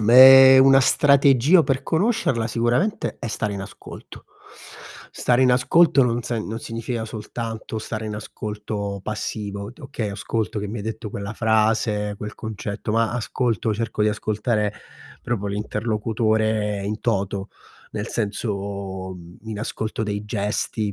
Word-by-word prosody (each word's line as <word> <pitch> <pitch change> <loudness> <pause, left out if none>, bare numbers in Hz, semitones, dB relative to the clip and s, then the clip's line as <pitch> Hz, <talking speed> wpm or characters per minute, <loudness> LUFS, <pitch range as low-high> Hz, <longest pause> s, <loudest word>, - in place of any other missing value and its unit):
meh, 130 +4 +9
una 135 0 +7
strategia 140 +4 +5
per 135 -3 -1
conoscerla, 165 - 0
sicuramente, 120 - 0
è - - -5
stare 105 -2 -2
in 95 - -5
ascolto. - - -11 0.9
Stare 120 +1 +1
in 125 - +5
ascolto 135 +3 +4
non 120 -1 0
sen 115 -3 -3
non 110 +1 -4
significa 115 0 -4
soltanto 110 0 -6
stare 110 0 -5
in 105 - -4
ascolto 105 -1 -5
passivo, 105 -1 -4
do 140 +2 -14
okay, 120 -6 -4
ascolto 105 +1 -3
che 105 0 -4
mi 110 - -5
hai - - -5
detto 110 0 -5
quella 100 +1 -5
frase, 110 -1 +1
quel 105 0 -6
concetto, 105 -1 -5
ma 115 +1 +1
ascolto 115 -2 -1
cerco 110 0 -2
di 105 - +3
ascoltare 105 0 -1 0.5
proprio 115 -5 -2
l'interlocutore 110 0 -1
in 105 +2 -3
toto, 100 -3 -1 0.4
nel 105 +1 -4
senso, 100 -3 -4
mhmm, 85 0 -13
in 110 -2 -6
ascolto 110 0 -3
dei 105 -1 -3
gesti, 105 0 -2
110 Hz, 140 wpm, -22 LUFS, 105-120 Hz, 0.9 s, meh